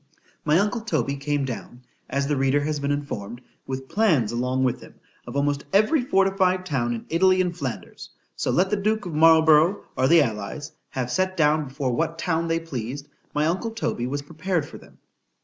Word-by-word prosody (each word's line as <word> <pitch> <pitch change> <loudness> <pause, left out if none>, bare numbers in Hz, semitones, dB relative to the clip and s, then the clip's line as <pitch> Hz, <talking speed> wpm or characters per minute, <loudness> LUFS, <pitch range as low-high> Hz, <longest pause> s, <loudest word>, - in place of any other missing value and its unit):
My 155 +1 +3
uncle 210 +4 +1
Toby 215 -11 -1
came 145 0 -1
down, 125 0 -7 0.3
as 140 0 0
the 145 +1 0
reader 135 +1 +2
has 150 0 -2
been 140 0 -2
informed, 120 -6 -4 0.3
with 130 0 -5
plans 165 - +2
along 125 +2 0
with 125 -2 0
him, - - -14 0.3
of - - -7
almost 140 0 0
every 215 +10 +4
fortified 190 -5 +2
town 130 -8 -1
in 115 - -8
Italy 185 +3 +3
and 180 -2 0
Flanders; 135 -8 -6 0.3
so - - -2
let 190 +2 +2
the 210 - +2
duke 215 +1 0
of 175 - -5
Marlborough, 160 +3 +5
or 130 0 +2
the 165 +1 +6
allies, 115 +6 -5 0.2
have 125 -2 -3
set 185 +3 0
down 150 -1 +2
before 130 -1 -2
what 165 +5 -1
town 165 -1 -1
they 165 0 +1
pleased, 140 -3 -6 0.3
my 150 +1 +2
uncle 185 +8 -1
Toby 220 - -2
was 140 +2 -3
prepared 165 +1 -2
for - - -11
them. - - -19
150 Hz, 190 wpm, -24 LUFS, 135-185 Hz, 0.3 s, the